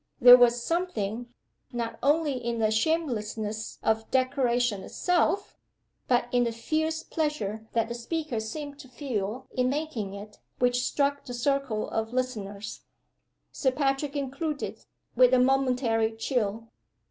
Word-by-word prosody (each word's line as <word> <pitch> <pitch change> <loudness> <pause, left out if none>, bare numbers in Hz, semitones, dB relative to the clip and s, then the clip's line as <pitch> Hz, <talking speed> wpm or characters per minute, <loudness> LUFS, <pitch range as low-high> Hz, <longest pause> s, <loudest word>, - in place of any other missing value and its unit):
There 245 0 +11
was 240 -1 +4
something, 240 - -2 0.4
not 230 -2 -4
only 295 +2 +2
in 235 -2 -3
the 215 -1 +2
shamelessness 220 -5 -1
of 220 0 +3
the 225 - -21
declaration 245 -5 +1
itself, 360 - 0 0.5
but 245 -1 +2
in 245 0 +3
the 235 - 0
fierce 315 +7 -1
pleasure 220 -9 -2
that 230 -1 +1
the 235 - -4
speaker 255 +1 -3
seemed 285 +6 -6
to 280 - -11
feel 245 -2 -4
in 255 0 +1
making 265 -9 -3
it, 205 +1 -10 0.2
which 245 0 +2
struck 280 +1 0
the 245 - -6
circle 265 -3 0
of 225 +1 -3
listeners, 215 -5 -3 0.7
Sir 265 - +1
Patrick 275 +1 0
included, 285 +2 -3 0.3
with 255 +1 +6
a - - +4
momentary 250 -4 +2
chill. 225 -2 -2
245 Hz, 135 wpm, -28 LUFS, 225-280 Hz, 0.7 s, There